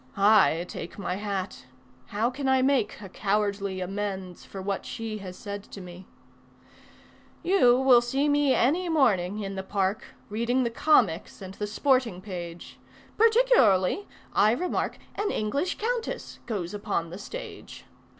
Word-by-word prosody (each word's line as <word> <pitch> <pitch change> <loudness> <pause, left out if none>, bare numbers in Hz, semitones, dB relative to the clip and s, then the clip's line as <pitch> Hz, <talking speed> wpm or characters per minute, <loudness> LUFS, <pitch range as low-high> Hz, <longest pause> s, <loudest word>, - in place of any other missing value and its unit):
I 200 -4 +5
take 170 - -7
my 185 -2 -3
hat: 200 -2 -4 0.4
how 225 +4 0
can 270 +1 -2
I 260 -1 +4
make 260 -6 +1
a 200 - -7
cowardly 200 -1 -1
amends 190 -1 -4
For 195 - -9
what 195 +1 -3
she 220 -2 -5
has 185 -2 -8
said 200 0 -6
to - - -10
me? 180 0 -11 1.4
You 335 -10 +5
will 260 -2 +6
see 270 +4 0
me 290 -2 +3
any 340 +9 +2
morning 210 - +2
in 195 -1 -4
the 190 - -3
park 195 +1 -1 0.2
Reading 235 +4 0
the 235 - -1
comics 230 - +2
and 190 -1 -8
the 210 +1 -4
sporting 250 -3 +1
page. 175 -3 -8 0.4
Particularly 420 - +4 0.3
I 215 +2 +4
remark 355 +8 -2 0.2
An 415 0 -1
English 280 - -1
countess 465 +1 -3
goes 195 -5 -3
upon 200 -5 -2
the 180 - -7
stage. - - -9
210 Hz, 145 wpm, -27 LUFS, 190-265 Hz, 1.4 s, will